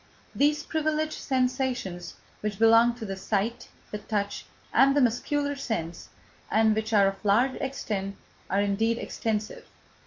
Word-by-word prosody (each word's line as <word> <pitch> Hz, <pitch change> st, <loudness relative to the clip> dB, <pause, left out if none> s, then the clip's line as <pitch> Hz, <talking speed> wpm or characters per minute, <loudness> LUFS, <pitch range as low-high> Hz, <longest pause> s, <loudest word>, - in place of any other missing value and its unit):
These 295 Hz, +1 st, +2 dB
privileged 310 Hz, 0 st, -1 dB
sensations 255 Hz, -9 st, -1 dB, 0.2 s
which 210 Hz, -2 st, -3 dB
belong 230 Hz, +2 st, +5 dB
to 235 Hz, -2 st, -7 dB
the 195 Hz, -2 st, -4 dB
sight, 205 Hz, +4 st, -2 dB, 0.2 s
the 210 Hz, -, -4 dB
touch, 205 Hz, -1 st, -3 dB, 0.3 s
and 275 Hz, +1 st, +5 dB
the -, -, +5 dB
muscular 285 Hz, +4 st, 0 dB
sense, 175 Hz, -11 st, -4 dB, 0.4 s
and 220 Hz, 0 st, +4 dB
which 220 Hz, +1 st, -2 dB
are 205 Hz, -2 st, +5 dB
of 195 Hz, +1 st, -2 dB
large 235 Hz, +6 st, +3 dB
extent, 205 Hz, -7 st, -3 dB, 0.3 s
are 195 Hz, +2 st, +2 dB
indeed 220 Hz, +3 st, +1 dB
extensive. 215 Hz, -2 st, -3 dB
225 Hz, 135 wpm, -27 LUFS, 200-265 Hz, 0.4 s, belong